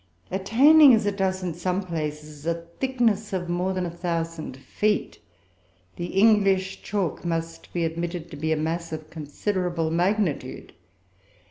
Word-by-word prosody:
Attaining, 260 - +7
as 220 - 0
it 205 -1 0
does 190 -1 0
in 175 -2 -2
some 180 +3 -1
places, 150 -3 -5
a 170 - +2 0.2
thickness 235 -6 +1
of 180 -2 -2
more 175 +2 0
than 185 -1 -1
a 170 - -4
thousand 165 -5 -3
feet, 210 +9 -1 0.8
the 175 - -4
English 195 -1 +3
chalk 195 -5 -2
must 165 -1 -4
be 170 -1 0
admitted 170 +1 -4
to - - -7
be 160 +2 -2
a 160 - +2
mass 165 +2 -2
of 155 -1 -7
considerable 165 +2 -2
magnitude. 180 -1 -1
175 Hz, 145 wpm, -25 LUFS, 165-195 Hz, 0.8 s, Attaining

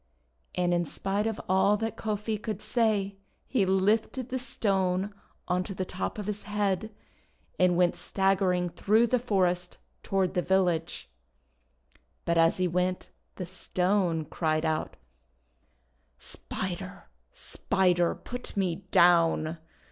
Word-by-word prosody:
And 175 0 +1
in 175 0 +2
spite 200 +5 -2
of 225 - -3
all 190 +2 +4
that 225 0 -3
Kofi 215 0 -2
could 215 -1 -4
say, 210 -4 0 0.3
he 210 -8 +1
lifted 215 +6 +1
the 260 - -2
Stone 195 -6 0 0.3
on 180 0 +1
to 195 0 -6
the 185 - -2
top 185 +3 -4
of 210 - -4
his 210 0 -4
head, 205 0 -1 0.7
and 180 -1 +4
went 180 -1 +3
staggering 190 -2 +1
through 215 +6 +3
the 250 +1 +1
forest 180 -6 0 0.2
toward 190 -2 0
the 180 - +1
village. 175 -3 0 1.2
But 170 0 +2
as 165 0 +4
he 185 -1 +1
went 180 +1 -1 0.3
the 185 - -5
Stone 180 -2 0
cried 155 0 -1
out: 155 -1 -1 0.7
— 60 0 -42 0.2
"Spider! - - -5 0.3
Spider! 180 -3 +1
Put 245 -4 -8
me 180 -4 +1
down! 165 -2 +4
190 Hz, 130 wpm, -28 LUFS, 175-210 Hz, 1.2 s, all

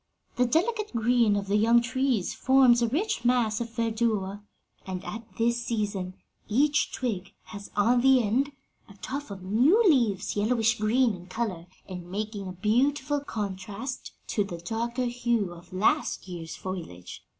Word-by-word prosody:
The 250 0 +2
delicate 420 - 0
green 230 -2 +3
of 200 -1 -1
the 200 +1 +1
young 230 +3 +5
trees 255 -4 0
forms 260 -2 +5
a 235 - +3
rich 400 - -1
mass 240 -3 +2
of 235 - -3
verdure, 220 -4 -1 0.4
and 185 -1 -6
at 225 +1 -6
this 235 +1 +1
season 200 -5 -2 0.3
each 285 +7 +2
twig 200 -6 -3
has 200 -2 -10
on 235 +4 +3
the 265 0 +6
end 255 +7 +1 0.4
a 200 - -14
tuft 280 +7 -6
of 195 -2 -8
new 245 - +4
leaves 220 - +2
yellowish 225 +2 +2
green 230 +2 +3
in 180 -1 -10
color 185 -4 -3 0.2
and 180 -2 -8
making 205 0 -4
a 185 - -6
beautiful 265 +9 +1
contrast 210 0 -5 0.2
to 205 - +1
the 180 -3 -6
darker 235 +8 -2
hue 235 -6 0
of 175 +1 -15
last 210 +6 +1
year's 170 -3 -7
foliage. 170 - -7
225 Hz, 155 wpm, -27 LUFS, 195-250 Hz, 0.4 s, the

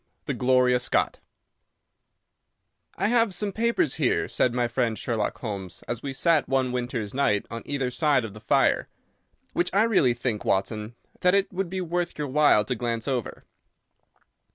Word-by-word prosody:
The - - -2
"Gloria 125 0 +3
Scott" 125 - 0 1.8
"I - - 0
have 230 -5 +2
some 200 +3 -2
papers 225 - +1
here," 125 - +2
said 125 - +1
my 120 0 0
friend 120 -2 -1
Sherlock 115 -3 -2
Holmes, 100 -6 -5
as 120 - -3
we 140 - -4
sat 160 +2 +2
one 130 -1 +1
winter's 120 -4 -3
night 105 -7 +1
on 115 0 -5
either 135 -3 -1
side 145 -3 +2
of 105 - -8
the 105 - -12
fire, 105 - +2 0.6
"which 175 - +1
I 205 - +5
really 185 - +3
think, 120 -3 -2
Watson, 105 +3 -1 0.2
that 180 +1 +4
it 200 0 +1
would 185 -1 -2
be 190 +1 -3
worth 175 0 -2
your 150 -2 -3
while 145 -7 +4
to 125 - -1
glance 115 0 -3
over. 130 -5 -3
125 Hz, 165 wpm, -26 LUFS, 115-170 Hz, 1.8 s, I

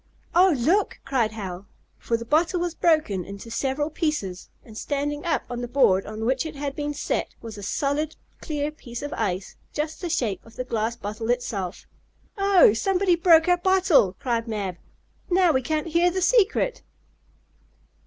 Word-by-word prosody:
"Oh, 360 -1 +5
look!" 335 - +1
cried 235 -5 0
Hal. 190 -3 -6 0.3
For 230 - -1
the 230 - -7
bottle 330 +7 +2
was 345 -1 -2
broken 310 - +2
into 200 +5 -9
several 275 +5 -1
pieces, 295 - -3 0.2
and 220 - -13
standing 290 +4 -2
up 330 - +1
on 245 -1 -5
the 245 - -3
board 235 -7 +3
on 215 +1 -5
which 260 +2 +1
it 315 -2 -7
had 280 -1 -4
been 295 0 -2
set, - - -2
was 225 -2 -8
a 205 - -9
solid, 285 +9 -1 0.3
clear 295 -2 -2
piece 240 -4 -8
of 290 - -4
ice, 185 0 -3 0.2
just 305 +1 -3
the 350 - -3
shape 235 - -1
of 225 - -17
the 255 - -3
glass 230 -1 -2
bottle 220 0 -5
itself. 215 -7 -2 0.5
"Oh, 395 - +5
somebody 370 - +2
broke 330 -1 +5
our 355 0 +4
bottle!" 360 - +3
cried 235 -2 -1
Mab. 200 -5 -3 0.5
"Now 360 -1 +4
we 260 -3 +1
can't 310 +3 -1
hear 340 +2 +3
the 370 +1 -1
secret!" 470 +3 +2
280 Hz, 175 wpm, -25 LUFS, 225-330 Hz, 0.5 s, Oh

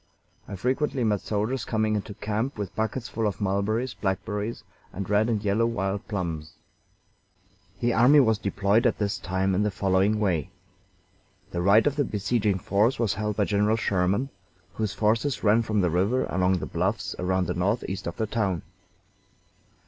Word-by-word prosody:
I - - -6
frequently 130 +5 0
met 105 -3 +1
soldiers 110 +4 -2
coming 110 -1 0
into 105 0 -4
camp 110 +7 -2
with 100 -2 -5
buckets 110 +3 -2
full 115 -1 -1
of 100 - -3
mulberries, 105 +5 0
blackberries, 105 +3 -3 0.3
and 95 0 -5
red 105 +3 +2
and 110 -3 0
yellow 105 +3 +2
wild 100 -3 -2
plums. 85 -7 -4 1.3
The 120 0 +2
army 130 +6 +6
was 110 -5 +3
deployed 105 +3 +2
at 120 - 0
this 100 -1 -1
time 95 0 0
in 95 - +1
the 105 - +2
following 100 +2 +1
way: 90 -6 0 1.0
The 85 - -2
right 100 +5 +5
of 145 0 +1
the 145 - +3
besieging 105 -2 0
force 105 +7 +1
was 115 -4 +1
held 105 +1 -2
by 105 - +2
General 105 +2 +2
Sherman, 100 +5 0 0.4
whose 110 +1 -2
forces 115 +5 +1
ran 110 +2 +4
from 110 -2 0
the 90 -3 +1
river 100 +9 +1
along 90 +1 +2
the - - -4
bluffs 95 +1 -2
around 95 +1 +1
the - - -2
northeast 95 +1 -2
of 85 - -5
the 110 - 0
town. 100 -6 -1
105 Hz, 170 wpm, -26 LUFS, 95-115 Hz, 1.3 s, army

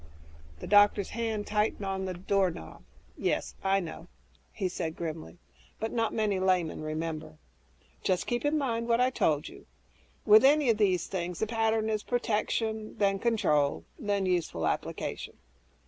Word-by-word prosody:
The - - -5
doctor's 205 -1 +4
hand 220 -2 -2
tightened 210 -1 0
on 190 0 -2
the 185 -1 -4
doorknob. 180 - -1 0.3
"Yes, - - -1
I 195 0 +3
know," 170 -4 -7 0.4
he 195 -4 -2
said 165 -3 -4
grimly, 165 0 -6 0.4
"but 220 +1 -2
not 230 -2 0
many 210 -3 0
laymen 185 -4 +1
remember. 155 0 -4 0.6
Just 185 -2 0
keep 240 0 -1
in 295 +1 +2
mind 235 -5 -1
what 235 0 +3
I 255 +1 +3
told 150 - +1
you. 390 +2 -13 0.6
With 215 +1 +8
any 285 -2 +5
of 220 - -2
these 185 -5 +2
things, 180 -2 -4
the - - 0
pattern 225 0 +1
is 215 -1 0
protection, 220 -2 -1
then 195 -1 +2
control, 155 -11 +1
then 205 -5 0
useful 170 - 0
application." - - -3
205 Hz, 150 wpm, -29 LUFS, 175-225 Hz, 0.6 s, With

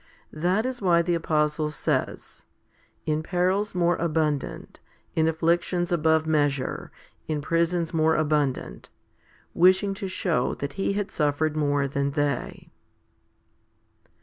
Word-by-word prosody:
That 180 +8 0
is 255 -2 -4
why 170 -3 +4
the 175 +1 0
apostle 150 -2 0
says 150 - -3 0.6
In 155 0 0
perils 185 +4 0
more 175 -1 +2
abundant, 155 -4 -2 0.4
in 160 0 +3
afflictions 175 +2 0
above 160 -1 +2
measure, 145 -4 0 0.4
in 155 -1 -1
prisons 170 +2 0
more 160 0 +3
abundant? 150 -3 -1 0.6
wishing 190 +3 +4
to 195 0 -5
show 170 -8 -1
that 140 0 -5
he 195 0 -1
had 200 -1 -3
suffered 150 0 0
more 145 -2 +1
than 140 0 -1
they. 145 -1 -2
160 Hz, 120 wpm, -25 LUFS, 150-175 Hz, 0.6 s, why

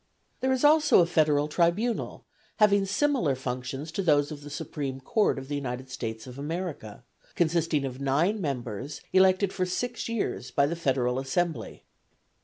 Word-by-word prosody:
There 260 - +1
is 260 0 0
also 300 -3 +6
a - - +4
federal 150 -3 +2
tribunal, 175 +9 0 0.3
having 200 -2 +4
similar 240 - +1
functions 130 +4 -5
to 195 - -2
those 145 -4 +3
of 145 -1 -7
the 145 - -9
supreme 140 -3 -5
court 210 - +1
of 135 0 -7
the 145 - -5
United 130 -2 -4
States 110 -3 -5
of 125 +1 -10
America, 155 - -5 0.3
consisting 165 -3 +1
of 130 0 -6
nine 165 +10 +1
members 135 - -4
elected 190 +1 +4
for 185 - -1
six 240 +7 -3
years 210 - -2
by 140 +3 +2
the 160 +4 -2
federal 130 -5 0
assembly. 160 +5 -2
150 Hz, 160 wpm, -27 LUFS, 135-190 Hz, 0.3 s, also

